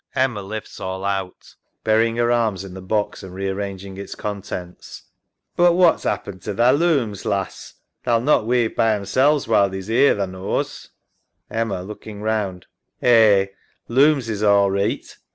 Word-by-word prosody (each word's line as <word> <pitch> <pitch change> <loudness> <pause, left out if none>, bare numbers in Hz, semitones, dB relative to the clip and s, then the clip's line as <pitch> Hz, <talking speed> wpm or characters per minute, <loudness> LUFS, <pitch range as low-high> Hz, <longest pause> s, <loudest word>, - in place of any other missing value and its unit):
[Lifts 110 -5 -2
all 95 +1 -4
out. 95 -2 -4 0.3
Burying 115 +1 +2
her 120 0 +1
arms 110 -6 +1
in 95 -2 -9
the 95 - -8
box 105 +3 -2
and 95 -1 -10
rearranging 95 0 -4
its 100 - -7
contents. 95 -3 -7 0.5
SARAH. 175 - +5
But - - +3
what's 175 -1 +3
'appened 95 -2 -3
to 105 - -5
thy 120 +3 +4
looms, 140 - +1
lass? 100 -2 -3 0.3
They'll 120 -2 +2
not 120 -3 +2
weave 120 -2 +1
by 110 -1 +3
'emselves 130 +8 +1
while 100 -3 +4
thee's 95 +2 -6
'ere, 140 +5 +4
tha 100 - -1
knows. 95 +1 -4 0.6
EMMA 110 -5 -2
{looking 105 +1 -9
round). 105 -4 -2 0.3
Eh, 110 -5 +5 0.4
looms 135 0 +3
is 105 -2 -3
all 100 -2 +4
reeght. 100 +1 -2
105 Hz, 150 wpm, -21 LUFS, 95-120 Hz, 0.6 s, SARAH